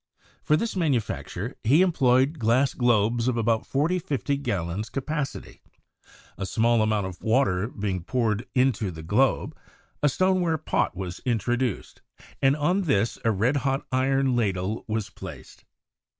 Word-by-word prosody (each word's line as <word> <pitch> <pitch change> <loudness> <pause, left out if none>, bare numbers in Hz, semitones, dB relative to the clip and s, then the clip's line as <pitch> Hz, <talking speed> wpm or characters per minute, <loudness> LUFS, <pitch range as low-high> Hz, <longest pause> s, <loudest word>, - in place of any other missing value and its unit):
For 150 - +2
this 230 +5 -2
manufacture, 125 - -2
he 145 +10 +5
em 185 - +2
ployed 135 +1 +2
glass 125 +4 +2
globes 120 -1 +2
of 125 -2 +1
about 115 -1 0
40 160 +7 +1
to - - -15
50 140 0 -1
gallons 100 -5 -3
capacity; 140 +2 -4 0.8
a 95 - -2
small 115 +3 +2
amount 110 -2 +1
of 95 -1 -8
water 110 -5 +2
having 120 - -13
been 95 -4 -2
poured 110 0 -1
into 125 -6 +2
the 80 -2 -8
globe, 120 +11 +1 0.5
a 150 - +4
stoneware 180 +1 +1
pot 155 - -1
was 90 -2 -5
introduced, 120 -1 -1 0.4
and 135 +1 +4
on 180 +6 +1
this 110 -6 +1
a 115 - +2
red 115 +7 +1
hot 135 0 -1
iron 135 0 +2
ladle 100 -2 -1
was 110 -1 -3
placed. - - -11
120 Hz, 150 wpm, -25 LUFS, 105-140 Hz, 0.8 s, he